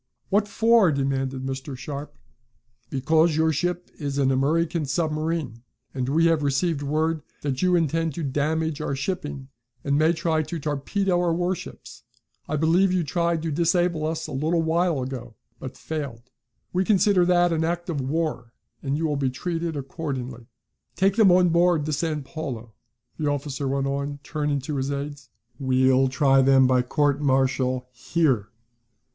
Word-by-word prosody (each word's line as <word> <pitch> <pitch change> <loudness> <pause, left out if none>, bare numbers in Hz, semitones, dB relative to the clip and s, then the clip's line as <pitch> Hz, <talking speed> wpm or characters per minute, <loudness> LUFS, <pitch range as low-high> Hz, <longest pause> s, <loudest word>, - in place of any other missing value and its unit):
"What 205 +1 +2
for?" 225 -3 +4
demanded 135 -1 -1
Mr. 135 0 -5
Sharp. 140 +2 -7 0.7
"Because 155 +4 +2
your 160 0 +2
ship 175 +3 -2
is 140 -2 -3
an 135 -1 +3
American 155 +5 +1
submarine, 155 -4 -2 0.3
and 130 -1 -2
we 165 +4 +3
have 165 -2 +3
received 145 +2 0
word 155 +2 0 0.2
that 135 -2 -2
you 180 -1 +3
intend 165 -1 0
to 170 - -4
damage 155 +2 -1
our 140 - -2
shipping, 145 -3 -4 0.3
and 140 +1 +1
may 160 +2 +4
try 160 -1 0
to 155 +2 -5
torpedo 175 +6 -1
our 170 -2 +1
warships. 180 +1 -4 0.5
I 155 - 0
believe 170 +5 +3
you 185 -2 +1
tried 170 +1 0
to 165 - -2
disable 170 +1 +1
us 160 0 -3
a 155 - -7
little 160 +5 0
while 165 -3 +1
ago, 125 -3 -7 0.2
but 130 - -8
failed. 135 -6 -6 0.4
We 185 +1 +2
consider 195 -2 +3
that 175 -1 +3
an 160 0 0
act 175 +1 -2
of 155 -6 -2
war 130 -4 -2 0.3
and 140 0 -1
you 165 - -1
will 150 -2 0
be 135 -2 +1
treated 165 +3 -3
accordingly. 130 -4 -5 0.5
Take 195 +1 +2
them 215 -5 +6
on 180 0 +5
board 170 -2 +3
the 155 - -2
San 155 0 -1
Paulo," 130 -7 -6 0.5
the 150 - 0
officer 140 -1 -3
went 135 0 0
on, 140 +1 -2
turning 150 -2 -2
to 140 +2 -4
his 135 +1 -1
aides. 140 -2 -5 0.3
"We'll 130 0 +3
try 135 0 +4
them 135 0 +5
by 130 0 +3
court 145 +3 +1
marital 130 -2 +1
here. 125 -3 0
150 Hz, 165 wpm, -24 LUFS, 135-165 Hz, 0.7 s, them